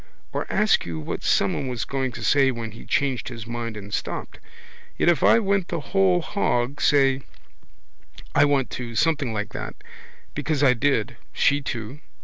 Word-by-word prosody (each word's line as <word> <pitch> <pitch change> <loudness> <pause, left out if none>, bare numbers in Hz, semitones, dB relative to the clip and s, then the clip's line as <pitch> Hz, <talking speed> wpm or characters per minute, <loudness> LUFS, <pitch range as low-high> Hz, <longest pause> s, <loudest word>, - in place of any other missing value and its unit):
Or - - -3
ask 210 0 +3
you 80 -2 -5
what 75 - -4
someone 100 +7 +1
was 125 -4 -3
going 135 -2 -2
to - - -7
say 140 -2 +4
when 115 -3 -4
he 110 - -12
changed 135 -3 0
his 115 -3 -7
mind 115 -1 -4
and 100 0 -9
stopped. - - -4 0.6
Yet - - +3
if 170 -6 +3
I - - +6
went 200 -4 +1
the 170 - -2
whole 185 +2 +2
hog, 140 -9 -1
say: 135 -2 +4 1.1
I 145 - +5
want 140 -3 +1
to, 120 -2 -5
something 145 -3 +1
like 105 0 -3
that. - - -5 0.6
Because 150 0 -1
I 130 -3 +6
did. 125 -2 0 0.2
She 145 0 +3
too. 120 +1 -5
135 Hz, 170 wpm, -24 LUFS, 115-145 Hz, 1.1 s, I